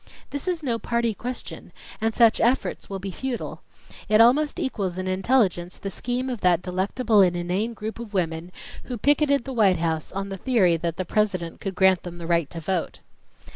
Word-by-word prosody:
"This 285 +4 -4
is 350 -3 -1
no 235 -4 -1
party 235 -1 0
question, 245 +5 -7 0.3
and 225 +1 +2
such 225 0 +4
efforts 245 +3 0
will 195 - -3
be 190 0 -5
futile. 255 +4 -5 0.5
It 215 0 +5
almost 285 +8 +4
equals 200 - -2
in 185 0 -3
intelligence 185 -3 +1
the 195 - -5
scheme 245 +4 -2
of 245 -4 -4
that 180 -1 +3
delectable 200 +4 +2
and 180 -2 +4
inane 185 +7 -2
group 220 +2 -6
of 235 -3 -7
women 170 -2 -2 0.3
who 245 - -4
picketed 285 +2 +3
the 270 - -5
White 200 -6 +4
House 160 -2 -2
on 195 +1 -4
the 195 - -5
theory 190 -7 +3
that 165 0 -3
the 185 - -2
President 185 -4 -1
could 195 -2 -4
grant 190 -2 +4
them 175 -1 -8
the 170 - -7
right 170 -3 +1
to 165 - -7
vote." 170 +1 -3
200 Hz, 195 wpm, -24 LUFS, 180-240 Hz, 0.5 s, It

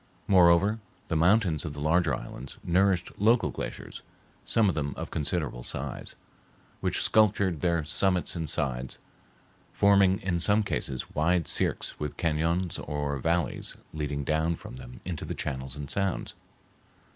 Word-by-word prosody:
Moreover, 95 +3 +5 0.3
the 80 - 0
mountains 85 -2 +3
of 75 - -5
the 75 - -8
larger 80 0 +2
islands 65 +2 -9
nourished 90 0 +2
local 115 +4 +3
glaciers, - - -6 0.4
some 115 -2 +2
of 95 - +2
them 70 -2 -2
of - - -6
considerable 75 -5 -2
size, 65 +2 -5 0.6
which - - 0
sculptured 100 -6 +3
their 85 -2 +1
summits 90 +4 0
and 80 -3 -3
sides, 65 -4 -2 0.8
forming 100 -1 +4
in 90 -3 -1
some 105 +5 +4
cases 65 -9 -1
wide 85 +2 +1
cirques - - -2
with 75 -1 -4
cañons 85 +2 0
or 75 -2 -2
valleys 85 +4 -1 0.2
leading 75 -2 -3
down 80 +3 +1
from 110 +6 -11
them 125 -1 -10
into 85 -4 -4
the - - -4
channels 65 0 -3
and 75 -1 -6
sounds. 100 -2 -1
85 Hz, 145 wpm, -28 LUFS, 75-95 Hz, 0.8 s, Moreover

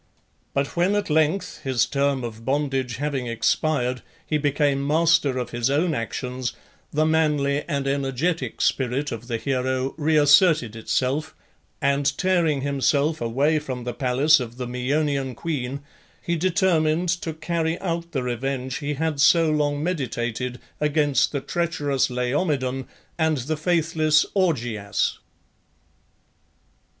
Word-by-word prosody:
But 140 0 -1
when 180 +4 +2
at 205 -6 -1
length, 160 +5 +1
his 130 -3 +1
term 140 -2 0
of 115 -1 -7
bondage 135 -2 -1
having 140 -3 -2
expired, 125 +2 0 0.2
he 150 - 0
became 145 -1 +1
master 150 -3 +3
of 125 -1 -3
his 120 +1 0
own 155 +4 +1
actions, 125 0 -3 0.4
the 155 +1 +2
manly 150 -3 +2
and 140 -3 -1
energetic 135 0 -1
spirit 135 +2 0
of 115 +1 -6
the 115 -2 -1
hero 130 +1 -1
reasserted 150 - +4
itself, 130 +6 -1 0.5
and 140 +1 +1
tearing 170 -7 +2
himself 140 +2 +1
away 140 +7 +1
from 130 -4 -5
the 120 0 -4
palace 135 +5 +3
of 120 -1 -6
the 125 - -3
Maeonian 135 +1 -1
queen, 140 -4 -3 0.4
he 170 - -2
determined 175 -2 +2
to 160 - -3
carry 165 0 -1
out 170 -2 -3
the 135 -5 -2
revenge 130 +1 -3
he 145 -1 -3
had 155 -1 -1
so 160 +2 +5
long 145 -1 0
meditated 125 -6 -2 0.2
against 150 -1 +2
the 140 - -2
treacherous 145 -6 0
Laomedon 130 +1 -1 0.3
and 160 -1 +2
the 140 +5 -2
faithless 155 -1 +2
Augeas. 120 - 0
140 Hz, 130 wpm, -24 LUFS, 130-155 Hz, 0.5 s, so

